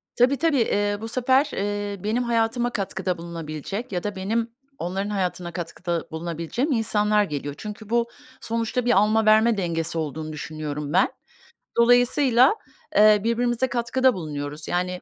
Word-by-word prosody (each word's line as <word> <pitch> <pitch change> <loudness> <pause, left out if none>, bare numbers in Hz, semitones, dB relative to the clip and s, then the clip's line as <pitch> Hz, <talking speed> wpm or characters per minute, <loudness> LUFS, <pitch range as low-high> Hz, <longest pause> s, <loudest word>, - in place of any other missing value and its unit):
Tabii, 255 +3 +4
tabii. 315 0 +2
Eee, 205 -1 +1
bu 225 - -4
sefer, 260 +4 +2
eee, 205 -1 -3
benim 225 +4 0
hayatıma 235 +1 +1
katkıda 190 -4 -2
bulunabilecek 170 - -6
ya 180 -2 -2
da 205 -1 -3
benim 225 +5 -1 0.3
onların 190 +4 -3
hayatına 180 -3 -2
katkıda 170 0 -4
bulunabileceğim 170 - -3
insanlar 210 -3 +2
geliyor. 145 -4 -4
Çünkü 210 0 -8
bu 235 0 +2 0.3
sonuçta 230 +2 -2
bir 245 - +3
alma, 215 +2 +3
verme 220 +1 +5
dengesi 170 -2 -2
olduğunu 155 0 -4
düşünüyorum 150 -1 -5
ben. - - +4 0.7
Dolayısıyla, 245 - +5 0.4
eee, 210 -1 +6
birbirimize 240 +2 +1
katkıda 250 +2 +2
bulunuyoruz, 150 -3 -6
yani, 180 0 -1
210 Hz, 140 wpm, -24 LUFS, 170-235 Hz, 0.7 s, eee